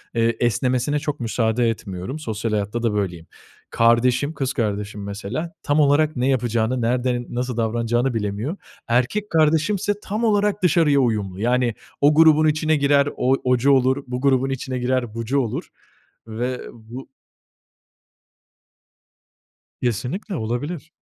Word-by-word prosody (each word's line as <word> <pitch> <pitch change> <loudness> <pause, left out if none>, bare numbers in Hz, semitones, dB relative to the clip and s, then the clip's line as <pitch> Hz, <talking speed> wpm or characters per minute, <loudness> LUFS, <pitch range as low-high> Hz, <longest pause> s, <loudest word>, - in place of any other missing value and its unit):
eee, 115 0 +1
esnemesine 125 +4 +1
çok 150 -1 -4
müsaade 115 0 +1
etmiyorum 105 - -5
sosyal 110 -5 -3
hayatta 105 +3 -2
da 115 -3 +1
böyleyim. 90 -5 -3 0.4
Kardeşim, 125 +5 +2
kız 135 -3 -2
kardeşim 105 -2 -3
mesela 105 - -5
tam 145 +1 +1
olarak 150 +1 +3
ne 125 0 0
yapacağını, 120 -1 0
nerede, 120 +1 0
nasıl 125 0 -3
davranacağını 120 +3 0
bilemiyor. 110 - -3 0.3
Erkek 125 - 0
kardeşimse 160 +6 +2
tam 215 +4 -3
olarak 210 -2 +1
dışarıya 155 -5 +4
uyumlu. 105 -7 -1
Yani, 120 0 +1 0.3
o 145 +1 +5
grubun 155 -1 +6
içine 155 +1 +2
girer 140 0 +3
o 130 +2 +2
ocu 125 +2 +3
olur, 130 +1 +3
bu 125 +1 -4
grubun 135 -1 +2
içine 130 -1 -3
girer 125 -2 -1
bucu 115 +4 -1
olur 120 -5 -3 0.6
ve, 120 +3 -3
ııı, - - -10
bu 120 +3 -11 2.7
Kesinlikle 125 - -2
olabilir. 145 +8 -4
125 Hz, 130 wpm, -22 LUFS, 115-145 Hz, 2.7 s, grubun